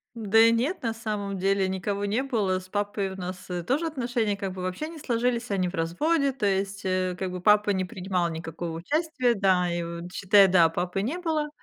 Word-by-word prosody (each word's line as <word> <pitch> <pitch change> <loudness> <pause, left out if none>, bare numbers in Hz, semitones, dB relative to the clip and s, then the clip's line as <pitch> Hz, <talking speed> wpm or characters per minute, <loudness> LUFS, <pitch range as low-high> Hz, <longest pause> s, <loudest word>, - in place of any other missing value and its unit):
Да 225 -1 +2
и 230 0 +7
нет, 255 +11 0
на 230 -2 -1
самом 210 -3 -4
деле 195 0 +1
никого 200 +2 -2
не 225 +6 0
было, 205 -8 0
с 185 - -13
папой 205 -1 -2
у - - -8
нас, 185 0 -7
э, 175 -1 -3
тоже 285 - 0
отношения 240 -7 -1
как 195 -1 -4
бы 185 - -7
вообще 185 - -3
не 330 - -10
сложились, 240 -3 -1
они 185 -2 +1
в 190 - -7
разводе, 275 - +1
то 255 -5 -3
есть, 195 0 0
э, 185 -1 0
как 190 -1 -2
бы 180 - -5
папа 210 +1 +4
не 190 -2 +1
принимал 180 -1 -2
никакого 165 0 -5
участия. 270 - 0
Да, 185 -3 +2
и 170 0 -2
вот 170 +1 -7
считай, 200 +1 +5
да, 175 -3 +5
папы 180 +3 -2
не 275 - -2
было. 310 -3 -1
200 Hz, 215 wpm, -26 LUFS, 185-235 Hz, -, и